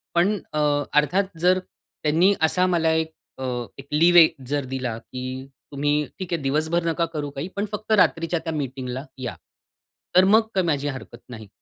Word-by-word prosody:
पण 195 +5 +3 0.2
अ, 150 - 0 0.3
अर्थात 180 +5 +1
जर 180 +2 +4
त्यांनी 175 0 0
असा 180 +3 +3
मला 165 -3 +2
एक 160 0 0 0.3
अ, 130 - -6 0.3
एक 135 0 -11
लीव्ह 170 +1 +7 0.2
जर 145 0 -1
दिला 130 -3 -3
की 125 +2 -9 0.5
"तुम्ही 145 +1 0 0.2
ठीक 185 -2 -4
आहे, 165 - -1
दिवसभर 155 +5 0
नका 165 0 +1
करू 150 -2 -3
काही 140 +3 -5
पण 200 +1 -1
फक्त 215 +1 -5
रात्रीच्या 170 -4 +3
त्या 165 - -3
मीटिंगला 130 -2 -4
या." 125 -2 -4 0.8
तर 185 - +8
मग 210 +4 +6
काही 190 -2 +2
माझी 145 -2 0
हरकत 130 -3 -6
नाही. 110 -3 -9
160 Hz, 170 wpm, -23 LUFS, 140-180 Hz, 0.8 s, तर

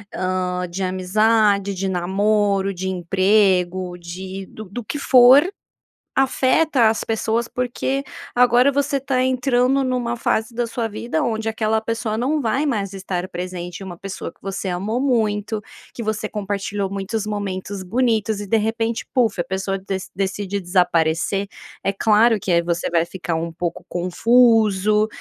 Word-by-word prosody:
hã, 185 -1 -1
de 185 +3 -5
amizade, 200 +2 +2
de 195 +1 -2
namoro, 195 +2 +1
de 190 +1 -3
emprego, 185 0 +2
de 185 +2 -7
do 215 - -10
do 210 +5 -7
que 255 - -4
for, 260 +2 +7 0.7
afeta 265 -1 +3
as 220 - -1
pessoas, 225 +1 -1
porque 250 +2 -2 0.3
agora 245 +2 +5
você 280 0 0
tá 260 -1 0
entrando 255 +1 +2
numa 250 -2 -1
fase 225 0 -1
da 240 0 -1
sua 230 0 -2
vida, 240 +8 -2
onde 225 -3 -2
aquela 220 0 0
pessoa 225 -1 -2
não 285 +6 0
vai 265 +5 0
mais 210 -9 -1
estar 185 -2 -4
presente, 175 -1 -6
e - - -8
uma 180 -2 -8
pessoa 195 -2 -6
que - - -35
você 195 0 -4
amou 200 +7 -2
muito, 220 -5 0 0.3
que 235 - -6
você 215 -1 -2
compartilhou 200 -1 -3
muitos 200 +2 -3
momentos 200 -2 -4
bonitos 220 0 0
e - - -5
de 225 - +3
repente 225 +1 -1
"puff", 235 -7 +2
a - - -2
pessoa 190 0 -2
dec 190 0 -4
decide 195 +1 -2
desaparecer. 175 +1 +1 0.4
É 195 - 0
claro 220 +2 +4
que 190 - -2
é, 170 - +4
e - - +3
você 170 0 -2
vai 170 -1 +2
ficar 175 -2 -4
um 165 +1 -3
pouco 175 +1 -4
confuso, 215 +2 +3
205 Hz, 155 wpm, -21 LUFS, 185-235 Hz, 0.7 s, for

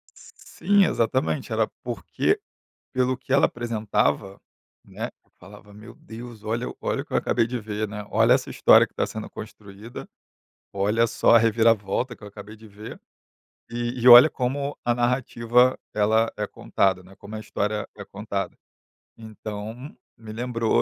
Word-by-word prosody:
Sim, 200 -1 0
exatamente. 115 - -1
Era - - +1 0.2
porque, - - -1 0.5
pelo 130 0 +1
que 130 0 -5
ela 140 - +5
apresentava, 110 -4 -1 0.5
né, - - -6
eu - - -38
falava: 105 +2 -15
“Meu 110 +3 -12
Deus, 115 -1 -11
olha 115 +3 -2
olha - - -1
o - - -10
que - - -12
eu - - +3
acabei 115 - +1
de 125 0 -3
ver, 105 0 -4
né. 105 0 -7
Olha 115 +3 +4
essa 130 0 0
história - - +5
que - - -37
tá - - 0
sendo 110 0 -7
construída, 105 +1 -10 0.7
olha 105 +4 +1
só 115 - +3
a - - +8
reviravolta 115 +1 +1
que - - -20
eu 105 - -8
acabei 105 +1 -11
de 110 0 -15
ver. 105 +1 -10 0.7
E 120 +1 -3
e 125 - +6
olha 120 +4 +11
como 140 +3 -2
a 120 - +2
narrativa 120 0 +2 0.2
ela 110 +2 +2
é 105 0 -2
contada, 95 -2 0
né. 95 +2 -17
Como 100 +1 -11
a - - -6
história 105 0 -3
é 100 - -8
contada". 100 -1 -5 0.6
Então 110 +3 -8 0.2
me 110 -1 -10
lembrou 115 0 0
110 Hz, 160 wpm, -24 LUFS, 105-120 Hz, 0.7 s, olha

